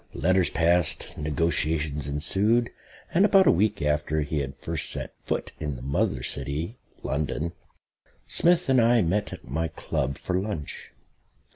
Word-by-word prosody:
Letters 90 Hz, +5 st, +2 dB
passed; 85 Hz, 0 st, +1 dB
negotiations 75 Hz, -1 st, 0 dB
ensued; 100 Hz, +11 st, +1 dB, 0.4 s
and 185 Hz, -, +4 dB
about 195 Hz, -2 st, +6 dB
a -, -, +6 dB
week 105 Hz, +1 st, +1 dB
after 75 Hz, +1 st, 0 dB
he 75 Hz, +1 st, -2 dB
had 70 Hz, 0 st, -4 dB
first 80 Hz, +4 st, 0 dB
set -, -, -2 dB
foot -, -, -3 dB
in 75 Hz, -3 st, -3 dB
the -, -, -9 dB
Mother 65 Hz, -2 st, -1 dB
City 75 Hz, -, -3 dB, 0.2 s
(London) 75 Hz, +3 st, -2 dB, 0.7 s
Smith 175 Hz, 0 st, +4 dB
and 130 Hz, -2 st, +4 dB
I 115 Hz, -1 st, +4 dB
met 100 Hz, +5 st, 0 dB
at -, -, -9 dB
my 80 Hz, +6 st, -1 dB
Club 70 Hz, -4 st, -3 dB
for 90 Hz, 0 st, -1 dB
lunch. 95 Hz, -8 st, -5 dB
80 Hz, 145 wpm, -26 LUFS, 75-105 Hz, 0.7 s, about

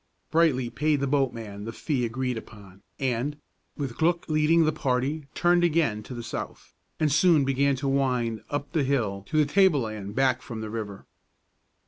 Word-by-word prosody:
Brightly 145 Hz, -7 st, +2 dB
paid 150 Hz, +3 st, +1 dB
the 140 Hz, -, 0 dB
boatman 115 Hz, -7 st, -1 dB
the 115 Hz, -, -4 dB
fee 125 Hz, +1 st, -1 dB
agreed 125 Hz, +2 st, -2 dB
upon, 100 Hz, -4 st, -11 dB, 0.2 s
and, 135 Hz, +2 st, -1 dB, 0.4 s
with 135 Hz, -5 st, -4 dB
Glück 170 Hz, +1 st, +1 dB
leading, 155 Hz, +1 st, +3 dB
the 155 Hz, -, +3 dB
party 140 Hz, +1 st, -1 dB
turned 175 Hz, 0 st, +3 dB
again 155 Hz, -11 st, +2 dB
to 125 Hz, +4 st, -9 dB
the 120 Hz, -, -6 dB
south, -, -, -7 dB, 0.3 s
and 155 Hz, -2 st, +2 dB
soon 155 Hz, -1 st, +4 dB
began 135 Hz, +1 st, +2 dB
to 135 Hz, +2 st, -3 dB
wind 125 Hz, -5 st, 0 dB
up 145 Hz, 0 st, -3 dB
the 155 Hz, -, +1 dB
hill 110 Hz, -8 st, -1 dB
to 155 Hz, -, -1 dB
the 150 Hz, -, +5 dB
tableland 115 Hz, -, +2 dB
back 130 Hz, -1 st, +2 dB
from 115 Hz, -2 st, -7 dB
the 110 Hz, -1 st, -5 dB
river. 105 Hz, -3 st, -6 dB
135 Hz, 170 wpm, -26 LUFS, 115-150 Hz, 0.4 s, the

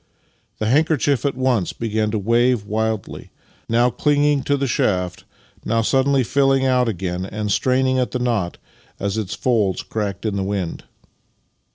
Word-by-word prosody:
The 110 Hz, -, -2 dB
handker 155 Hz, +7 st, +3 dB
chief 140 Hz, 0 st, +1 dB
at 140 Hz, -, -2 dB
once 125 Hz, -8 st, +1 dB
began 110 Hz, -2 st, -1 dB
to 110 Hz, -, -1 dB
wave 115 Hz, +2 st, +2 dB
wildly 110 Hz, -1 st, -3 dB, 0.2 s
— -, -, -34 dB
now 120 Hz, +2 st, +3 dB
clinging 145 Hz, +2 st, +2 dB
to 145 Hz, -, +2 dB
the 140 Hz, -, -1 dB
shaft, 90 Hz, -7 st, -1 dB, 0.4 s
now 115 Hz, +1 st, +1 dB
suddenly 135 Hz, +3 st, +2 dB
filling 135 Hz, +1 st, +2 dB
out 125 Hz, -2 st, +2 dB
again 90 Hz, -3 st, -3 dB
and 105 Hz, +1 st, -3 dB
straining 130 Hz, +3 st, +2 dB
at 125 Hz, -, 0 dB
the -, -, -2 dB
knot 115 Hz, -8 st, -1 dB, 0.4 s
as 100 Hz, 0 st, -2 dB
its 105 Hz, -3 st, -3 dB
folds 105 Hz, -7 st, 0 dB
cracked 100 Hz, -2 st, -4 dB
in 105 Hz, -2 st, -1 dB
the 95 Hz, -, -1 dB
wind. 95 Hz, -4 st, -3 dB
115 Hz, 165 wpm, -21 LUFS, 100-130 Hz, 0.4 s, handker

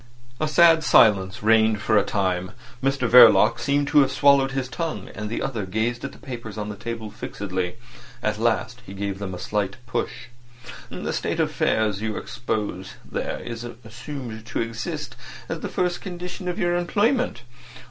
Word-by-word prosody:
A 155 Hz, -, +1 dB
sad 165 Hz, +1 st, +6 dB
silence 100 Hz, -8 st, +4 dB
reigned 110 Hz, -1 st, +4 dB
for 110 Hz, +1 st, +1 dB
a 105 Hz, -, +5 dB
time. 95 Hz, -2 st, -1 dB, 0.3 s
Mr 135 Hz, -2 st, +1 dB
Verloc 120 Hz, -1 st, +7 dB
seemed 140 Hz, +4 st, +1 dB
to -, -, +5 dB
have 135 Hz, -2 st, +4 dB
swallowed 140 Hz, -1 st, +4 dB
his 135 Hz, -1 st, -2 dB
tongue, 160 Hz, +6 st, -4 dB
and 105 Hz, 0 st, -5 dB
the 115 Hz, -, -3 dB
other 115 Hz, -6 st, -2 dB
gazed 110 Hz, +5 st, -1 dB
at 140 Hz, -, -4 dB
the -, -, -15 dB
papers 120 Hz, -5 st, -8 dB
on 105 Hz, 0 st, -4 dB
the 105 Hz, -, -5 dB
table 110 Hz, 0 st, -6 dB
fixedly. 95 Hz, -2 st, -4 dB, 0.5 s
At 105 Hz, 0 st, -1 dB
last 120 Hz, +1 st, 0 dB
he 100 Hz, -4 st, -10 dB
gave 100 Hz, -1 st, -3 dB
them 95 Hz, -2 st, -4 dB
a -, -, -6 dB
slight 100 Hz, 0 st, -2 dB
push. -, -, -4 dB, 0.6 s
"The -, -, -4 dB
state -, -, -2 dB
of -, -, +1 dB
affairs 105 Hz, -2 st, +1 dB
you 110 Hz, -1 st, -2 dB
expose 105 Hz, -5 st, -4 dB
there -, -, -4 dB
is 115 Hz, -1 st, -6 dB
assumed 120 Hz, 0 st, -8 dB
to -, -, -3 dB
exist 115 Hz, -1 st, -4 dB, 0.3 s
as -, -, -4 dB
the -, -, -5 dB
first 180 Hz, -1 st, -1 dB
condition 180 Hz, 0 st, -6 dB
of 180 Hz, -, -2 dB
your 175 Hz, 0 st, +1 dB
employment. 205 Hz, -, +1 dB
115 Hz, 175 wpm, -24 LUFS, 105-140 Hz, 0.6 s, Verloc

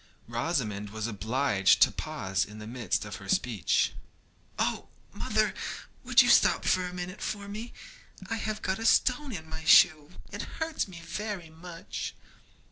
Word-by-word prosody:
Rosamond 115 Hz, -5 st, -2 dB
was 110 Hz, +1 st, -4 dB
obliged 110 Hz, -1 st, +2 dB
to -, -, +3 dB
pause 95 Hz, 0 st, -2 dB
in 105 Hz, +1 st, -10 dB
the 105 Hz, -, -8 dB
midst 110 Hz, -4 st, -2 dB
of 105 Hz, -1 st, -6 dB
her 100 Hz, 0 st, -11 dB
speech. 110 Hz, -, +1 dB, 0.6 s
'Oh, -, -, -1 dB, 0.3 s
mother, -, -, 0 dB, 0.5 s
would -, -, +6 dB
you -, -, 0 dB
stop -, -, +5 dB
a 185 Hz, -, +3 dB
minute 180 Hz, +2 st, -6 dB
for 200 Hz, -1 st, -4 dB
me? 215 Hz, +4 st, -6 dB, 0.6 s
I 225 Hz, -, -2 dB
have 215 Hz, -1 st, -4 dB
got 190 Hz, +2 st, -1 dB
a 225 Hz, -, -4 dB
stone 260 Hz, +4 st, +3 dB
in 160 Hz, -7 st, -6 dB
my 160 Hz, 0 st, -7 dB
shoe; 155 Hz, -1 st, +6 dB, 0.2 s
it -, -, -5 dB, 0.2 s
hurts 320 Hz, -6 st, -2 dB
me 175 Hz, -3 st, -10 dB
very 195 Hz, -2 st, -5 dB
much.' 165 Hz, +1 st, -7 dB
160 Hz, 155 wpm, -29 LUFS, -, 0.6 s, would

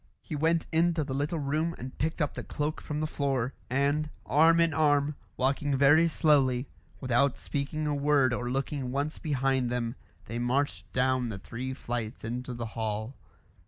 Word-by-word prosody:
He -, -, -5 dB
went 160 Hz, +2 st, +2 dB
into 165 Hz, 0 st, +2 dB
the 135 Hz, -2 st, -4 dB
little 145 Hz, +5 st, -1 dB
room 155 Hz, +3 st, -1 dB
and 130 Hz, +1 st, -7 dB
picked 160 Hz, +2 st, 0 dB
up 145 Hz, -, -2 dB
the -, -, -6 dB
cloak 150 Hz, +1 st, -3 dB
from 150 Hz, 0 st, -4 dB
the -, -, +1 dB
floor, 135 Hz, -4 st, -1 dB, 0.2 s
and, 140 Hz, +4 st, +1 dB, 0.2 s
arm 160 Hz, +7 st, +5 dB
in 165 Hz, -2 st, +3 dB
arm, 145 Hz, -1 st, +3 dB, 0.2 s
walking 135 Hz, +2 st, +1 dB
very 145 Hz, +5 st, +6 dB
slowly, 140 Hz, -6 st, +3 dB, 0.3 s
without 130 Hz, +1 st, +2 dB
speaking 150 Hz, +2 st, -3 dB
a 150 Hz, -, 0 dB
word 140 Hz, -3 st, +3 dB
or 120 Hz, 0 st, -2 dB
looking 135 Hz, 0 st, -2 dB
once 140 Hz, +3 st, -2 dB
behind 135 Hz, -4 st, +1 dB
them, 120 Hz, -1 st, -1 dB, 0.3 s
they 115 Hz, -, -4 dB
marched 130 Hz, +4 st, -1 dB
down 130 Hz, -1 st, +1 dB
the 105 Hz, -, -4 dB
three 130 Hz, +6 st, -5 dB
flights 120 Hz, -3 st, -4 dB
into 125 Hz, +2 st, -4 dB
the 120 Hz, 0 st, -4 dB
hall. 110 Hz, +2 st, -3 dB
140 Hz, 170 wpm, -29 LUFS, 125-150 Hz, 0.3 s, very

